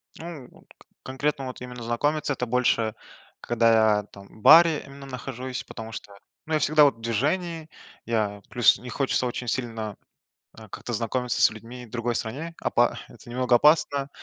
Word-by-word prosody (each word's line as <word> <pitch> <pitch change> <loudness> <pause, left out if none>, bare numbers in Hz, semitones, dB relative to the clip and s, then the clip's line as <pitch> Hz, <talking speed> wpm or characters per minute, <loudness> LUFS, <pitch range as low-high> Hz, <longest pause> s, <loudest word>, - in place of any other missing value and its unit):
Ну, 160 -6 -9
вот. - - -20
К - - -21 0.2
конкретно, 135 +1 -2
вот, 125 -1 -8
именно 125 -1 -8
знакомиться- 145 +6 0
это 125 - -3
больше, 115 -2 +1 0.5
когда 115 -1 +2 0.3
я, 105 - -2
там, 100 -1 -15
в 110 - -18
баре 160 +3 +7
именно 140 0 -12
нахожусь. 130 -1 -6
Потому 110 -1 -9
что, 105 -2 -9 0.3
ну, 160 - -4
я 155 - +3
всегда, 150 +1 +4
вот, 140 - +4
в - - -18
движении. 155 - -1 0.4
Я, 105 -3 -1
плюс, 120 -2 +4
не 125 - -10
хочется 135 -1 0
очень 125 0 -4
сильно, 115 -4 -3 0.6
э, 110 -1 -11
как-то 120 - -7
знакомиться 120 +2 -1
с - - +7
людьми 120 +3 -10
в - - -18
другой 120 +1 -2
стране. 145 +11 -4
Опа - - +2
это - - -15
немного 125 0 +2
опасно, 145 0 +3
125 Hz, 175 wpm, -25 LUFS, 115-145 Hz, 0.6 s, баре